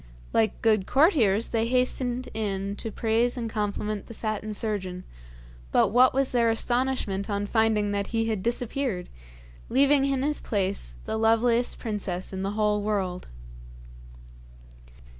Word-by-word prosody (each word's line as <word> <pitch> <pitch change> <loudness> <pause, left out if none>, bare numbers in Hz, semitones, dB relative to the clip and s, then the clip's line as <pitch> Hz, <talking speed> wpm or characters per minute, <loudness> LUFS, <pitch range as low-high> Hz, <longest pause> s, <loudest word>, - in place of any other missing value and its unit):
Like 220 -1 +1
good 215 -4 +3
courtiers, 245 - +3
they 225 0 0
hastened 250 0 0
in 200 -2 -2
to 225 - -4
praise 230 +3 +1
and 235 -2 -3
compliment 210 -1 -3
the 230 - -9
Satin 215 -1 -3
Surgeon, 190 -4 -3 0.7
but - - +4
what 250 +4 +5
was 270 0 0
their 235 -2 +3
astonishment 235 -4 0
on 200 0 -1
finding 215 -1 +1
that 200 0 -1
he 225 -1 -1
had 220 -4 -1
disappeared, 235 -3 -2 0.6
leaving 275 +2 +4
in 270 -1 0
his 295 +1 0
place 190 - -2
the 220 - -2
loveliest 230 +2 +2
princess 200 -5 -3
in 190 - -4
the 195 +1 -2
whole 210 -1 +2
world. 195 -4 -2
220 Hz, 140 wpm, -26 LUFS, 200-245 Hz, 0.7 s, what